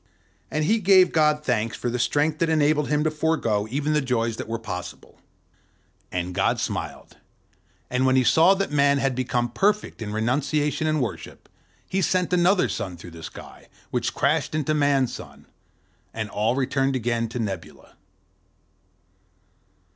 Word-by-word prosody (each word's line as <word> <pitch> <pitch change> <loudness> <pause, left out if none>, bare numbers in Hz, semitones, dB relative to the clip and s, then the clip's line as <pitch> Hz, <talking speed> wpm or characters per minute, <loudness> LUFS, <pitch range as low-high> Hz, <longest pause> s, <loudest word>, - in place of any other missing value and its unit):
And 155 - -1
he 225 +7 +2
gave 190 -2 +5
God 150 -1 +3
thanks 115 -5 -1
for - - -4
the 125 - -2
strength 150 +4 +1
that 165 - +1
enabled 150 -1 +2
him 150 0 +1
to 155 - +1
forgo 150 -10 0
even 145 +4 -1
the 150 - +2
joys 115 -3 -1
that - - -6
were 115 +1 -2
possible. 95 -6 -8 0.9
And 90 0 -3
God - - +1
smiled: - - -5 0.7
and 125 +1 0
when 130 0 +3
he 130 - +4
saw 165 +10 +5
that 195 -3 -2
Man 140 -1 +3
had 135 -1 0
become 120 -1 -1
perfect 205 - 0
in 105 -2 -4
renunciation 145 +7 0
and 155 -3 +1
worship, 120 - -7 0.4
he 195 - -1
sent 180 0 +1
another 180 +2 +3
sun 95 -6 -4
through 85 +1 -11
the 80 0 -11
sky, - - -11 0.2
which - - -1
crashed - - +1
into 155 0 0
Man's 140 -4 +2
sun; - - -11 0.7
and 110 -2 -4
all 110 +4 0
returned 135 0 0
again 115 -2 -1
to 115 - -6
nebula. 100 -7 -6
135 Hz, 160 wpm, -24 LUFS, 115-155 Hz, 0.9 s, gave